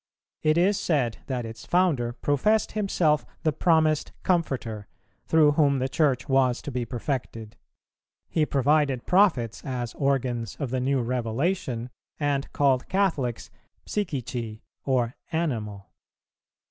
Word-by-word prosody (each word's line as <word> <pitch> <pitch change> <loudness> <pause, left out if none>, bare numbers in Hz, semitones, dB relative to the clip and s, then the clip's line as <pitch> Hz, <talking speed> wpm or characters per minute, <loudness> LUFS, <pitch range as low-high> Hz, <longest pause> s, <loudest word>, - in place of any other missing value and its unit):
It 155 +1 +3
is 195 +4 +3
said 135 - 0
that 125 -4 -2
its 115 0 -8
founder 165 -10 +2
professed 145 - +1
himself 170 - +1 0.2
the 155 - +2
promised 160 -3 +2
Comforter, 125 - -1 0.4
through 155 -2 +5
whom 145 -2 +3
the 130 0 0
Church 140 -3 +1
was 130 -2 +3
to 145 - -5
be 125 -2 -2
perfected; 115 -3 -4 0.7
he 160 - +1
provided 140 -2 +2
prophets 180 - +2
as 125 -3 -4
organs 125 -6 -1
of 135 -4 -3
the 130 - 0
new 135 -1 +1
revelation, 125 +1 -2 0.3
and 145 -2 -1
called 135 -3 +2
Catholics 165 - 0 0.3
Psychici 125 - -3 0.2
or 125 -3 +1 0.2
animal. 110 - -3
135 Hz, 120 wpm, -26 LUFS, 120-155 Hz, 0.7 s, through